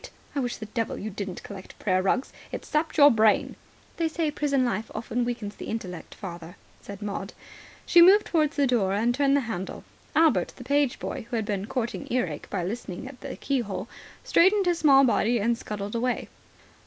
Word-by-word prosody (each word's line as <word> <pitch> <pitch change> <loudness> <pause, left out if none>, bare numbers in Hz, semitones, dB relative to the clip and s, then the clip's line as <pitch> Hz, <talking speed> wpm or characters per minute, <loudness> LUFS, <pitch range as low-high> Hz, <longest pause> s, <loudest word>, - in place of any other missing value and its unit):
I - - +1
wish 245 -2 -2
the 215 - -7
devil 225 +1 -3
you 215 - -5
didn't 195 -2 -6
collect 195 -2 -10
prayer 185 -2 +1
rugs. 225 +8 0 0.2
It's - - -6
sapped 310 +2 -1
your 290 -1 +8
brain." 220 -2 +3 0.4
"They 330 - +1
say 320 -1 -1
prison 280 -3 +1
life 220 -2 -2
often 235 +2 -2
weakens 230 -4 -4
the - - -7
intellect, 185 -6 -6
father," 175 -2 -8 0.3
said 200 +1 -9
Maud. 200 -1 -4 0.5
She 345 - +6
moved 390 +4 +7
towards 310 -2 +1
the 285 - +3
door 225 -7 +1
and 230 +4 +2
turned 280 +1 +3
the - - +1
handle. 210 -6 -5 0.3
Albert, 300 - +3
the - - -10
page 280 0 +1
boy, 245 -4 -5
who 240 - -3
had 220 -2 -1
been 205 -1 -2
courting 240 -2 -3
earache 180 -12 -2
by 195 -4 -2
listening 195 +2 -5
at 265 -2 -12
the 275 - -6
keyhole, 230 -7 -2 0.4
straightened 390 +3 +4
his 350 -1 +1
small 275 -3 +6
body 235 -1 +2
and 230 +3 +1
scuttled 205 -3 -6
away. 245 +2 -1
235 Hz, 190 wpm, -26 LUFS, 200-280 Hz, 0.5 s, your